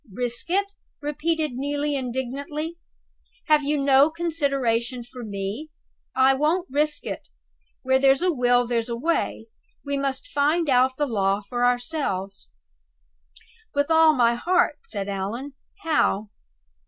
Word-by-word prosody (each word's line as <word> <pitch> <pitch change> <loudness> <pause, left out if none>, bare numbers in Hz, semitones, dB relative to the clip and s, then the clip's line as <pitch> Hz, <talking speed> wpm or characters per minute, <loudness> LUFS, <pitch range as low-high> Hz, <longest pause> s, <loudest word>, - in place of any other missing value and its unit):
"Risk 240 - -1
it?" 395 +3 +2 0.3
repeated 310 +1 -1
Neelie, 285 +3 -2
indignantly. 275 +5 -4 0.7
"Have 305 -1 +4
you 295 +1 0
no 275 +1 +5
consideration 275 -8 -1
for 245 +1 -10
me? 205 +8 -5 0.5
I 265 +1 +5
won't 310 +6 +1
risk 300 +2 0
it! - - -4 0.6
Where 260 0 +3
there's 270 +4 +4
a 365 - +3
will, 245 -3 +3
there's 235 0 -1
a 235 - -2
way. 300 -5 -1 0.4
We 280 0 -1
must 275 - -2
find 305 - +1
out 255 +1 +3
the 295 - +1
law 200 -5 +1
for 245 +4 -3
ourselves." 245 - -2 1.3
"With 285 +3 +1
all 320 -1 +6
my 240 -2 +4
heart," 350 +4 +1
said 200 -3 -4
Allan. 205 +8 -4 0.3
"How?" 220 -10 +1
270 Hz, 130 wpm, -24 LUFS, 240-300 Hz, 1.3 s, all